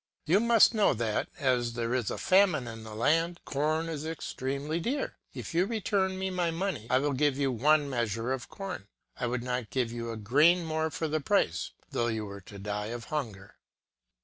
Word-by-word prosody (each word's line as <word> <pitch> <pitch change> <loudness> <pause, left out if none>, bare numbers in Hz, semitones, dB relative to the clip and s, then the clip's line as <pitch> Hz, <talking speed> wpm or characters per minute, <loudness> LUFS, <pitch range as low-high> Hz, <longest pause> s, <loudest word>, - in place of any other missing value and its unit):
You 180 +6 +4
must 235 0 +6
know 210 - +3
that, 110 -2 -1
as 125 -4 +1
there 120 0 -2
is 125 -6 0
a - - -3
famine 185 -9 +3
in 115 -1 -7
the 110 -1 -8
land, 165 +8 +2
corn 155 +3 0
is 155 -3 -4
extremely 150 -1 -3
dear. 265 - -2 0.2
If - - -6
you 175 +3 +3
return 200 -4 0
me 190 0 -2
my 180 -2 0
money, 165 - -2
I 130 - +4
will 145 +2 +1
give 140 0 +2
you 140 -2 +1
one 145 +5 +3
measure 120 -2 -1
of 130 -2 -5
corn: 190 - -6 0.3
I 125 - -2
would 120 0 -2
not 125 -2 -2
give 125 -3 -1
you 115 0 -4
a 115 - -4
grain 150 - +4
more 160 0 0
for 160 +1 -2
the 155 0 -1
price, 140 - +1 0.2
though 120 - 0
you 110 -2 -2
were 100 -1 -8
to 100 +2 -12
die 105 +1 -3
of 120 +1 -5
hunger. 105 -10 -4
140 Hz, 200 wpm, -29 LUFS, 115-165 Hz, 0.3 s, must